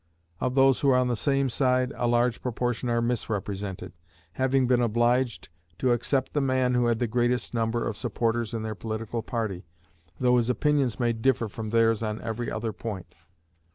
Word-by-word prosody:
Of 130 0 -1
those 135 -1 +5
who 140 - +2
are 130 - +5
on 125 -1 +2
the 120 - +1
same 135 +3 +1
side, 130 +1 +1
a 120 - -1
large 120 0 +2
proportion 125 0 -2
are 120 0 +1
misrepresented; 105 -5 -3 0.4
having 130 +5 +1
been 125 0 +3
obliged 120 +2 +1 0.3
to 130 - +1
accept 130 +3 0
the 145 - +1
man 130 -2 +1
who 125 -1 +2
had 115 -1 +2
the 120 - 0
greatest 120 +2 0
number 115 0 0
of 115 - -3
supporters 115 0 -1
in 110 - -3
their 110 0 -3
political 110 +2 -4
party, 110 -5 -3 0.6
though 125 -1 +4
his 120 0 +1
opinions 135 -2 +1
may 120 -1 +2
differ 115 0 +1
from 110 +1 -6
theirs 115 0 +3
on 110 -1 -2
every 115 +1 -3
other 110 0 -3
point. 100 -6 -6
120 Hz, 185 wpm, -27 LUFS, 115-125 Hz, 0.6 s, those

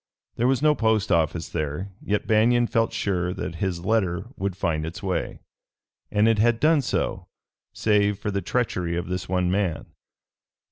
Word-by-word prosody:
There 120 - +2
was 135 +1 +1
no 150 -1 +5
post 110 -5 +1
office 85 0 +1
there, 80 +5 -3
yet 105 0 -1
Banion 120 +3 +4
felt 115 -1 +1
sure 90 -2 -1
that 90 -2 -5
his 90 -2 -2
letter 95 -6 +1
would 95 -1 -3
find 80 -4 -1
its 85 +7 -6
way, 90 -3 -2 0.7
and 105 +1 +3
it 115 -2 +3
had 115 +1 +3
done 155 +1 +4
so, 125 - -2 0.4
save 105 -2 +2
for 105 +1 -3
the 100 0 -1
treachery 90 -9 -1
of 85 0 -4
this 90 -1 -4
one 90 -1 +1
man. 95 -4 -1
100 Hz, 170 wpm, -24 LUFS, 90-110 Hz, 0.7 s, no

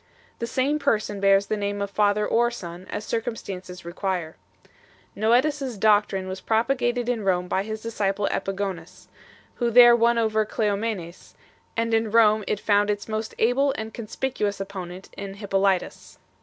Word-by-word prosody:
The 235 - -3
same 275 +5 0
Person 215 -7 0
bears 195 0 +4
the 215 - -1
name 205 -1 -2
of 200 0 -3
Father 210 0 +2
or 240 +1 +3
Son, 180 -6 -8
as 210 - -4
circumstances 190 -6 -5
require. 175 -2 -3 0.8
Noetus 250 +8 +2
s 255 -5 -4
doctrine 205 -2 +2
was 190 0 -6
propagated 240 +1 0
in 240 -3 -1
Rome 180 -2 +1
by 190 - 0
his 215 +1 -6
disciple 205 -3 -1
Epigonus 190 -3 -4 0.5
2, 240 - 0
who - - +3
there 240 0 +8
won 235 0 +3
over 220 -1 +2
Cleomenes, 205 -4 -3 0.4
and 230 0 0
in 225 0 +2
Rome 215 -1 +4
it 210 - -1
found 205 0 +2
its 205 0 -2
most 220 0 -4
able 265 +4 +2
and 220 0 -5
conspicuous 230 -2 -3
opponent 190 -2 -7
in 195 -1 -6
Hjp 200 -1 -9
polytus. 195 -1 0
210 Hz, 160 wpm, -24 LUFS, 195-230 Hz, 0.8 s, there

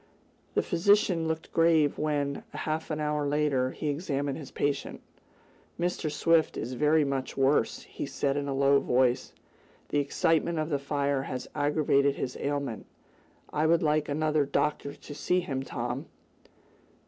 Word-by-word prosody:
The - - +3
physician 180 -2 +3
looked 160 0 -3
grave 165 -3 +3
when, 145 -2 -1
half 155 +1 -3
an 155 -1 -2
hour 150 -1 0
later, 140 -3 +1
he 150 - -5
examined 145 -2 -2
his 140 -4 -9
patient. 145 -1 -2 0.8
"Mr. 175 -3 -1
Swift 165 +1 +2
is 120 +3 -4
very 150 +4 +3
much 135 -1 -3
worse," 135 -3 +2
he - - -6
said 140 -1 -1
in 145 0 -2
a 140 - -1
low 140 +1 +4
voice. 125 -1 +1 0.6
"The 145 - +1
excitement 160 +3 +1
of 155 0 -1
the 140 - +1
fire 140 -1 0
has 130 -1 -5
aggravated 145 -1 +2
his 130 - -4
ailment. 140 -5 -3 0.7
I 155 +1 +2
would 165 0 +3
like 150 -1 +1
another 155 0 +1
doctor 145 0 -1
to 145 - -10
see 180 +5 +1
him, 135 -5 -3
Tom." 125 +2 -4
145 Hz, 150 wpm, -28 LUFS, 140-155 Hz, 0.8 s, low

